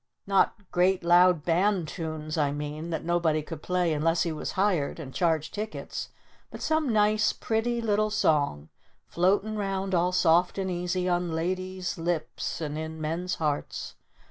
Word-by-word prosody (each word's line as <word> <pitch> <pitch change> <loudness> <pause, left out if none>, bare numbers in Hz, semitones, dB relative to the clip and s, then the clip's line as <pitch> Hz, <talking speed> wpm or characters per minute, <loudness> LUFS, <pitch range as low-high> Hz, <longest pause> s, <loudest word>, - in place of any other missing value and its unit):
Not 195 -1 +3 0.2
great 180 +1 +2
loud 175 -2 +5
band 180 0 +2
tunes, 155 -2 -5
I 145 -3 +1
mean, 150 +3 -5
that 160 -1 -3
nobody 165 -3 +1
could 155 0 -8
play 180 -2 +1
unless 165 +3 +2
he 170 - -1
was 155 - -4
hired! 185 -7 +1
And 135 -5 -8
charged 160 -3 0
tickets! 215 +1 -5 0.4
But - - -8
some 315 -4 +1
nice 215 0 +3
pretty 235 +1 -1
little 215 -1 +2
Song 145 - +1 0.4
floatin' 200 +5 +1
round 195 -1 -2
all 175 +1 +2
soft 180 0 +3
and 190 -1 -1
easy 180 +1 -1
on 175 -1 0
ladies' 185 +2 -3
lips 165 -2 -2
and 150 -1 -3
in 160 0 -5
men's 165 +4 -2
hearts. 150 -3 -3
175 Hz, 155 wpm, -27 LUFS, 160-190 Hz, 0.4 s, loud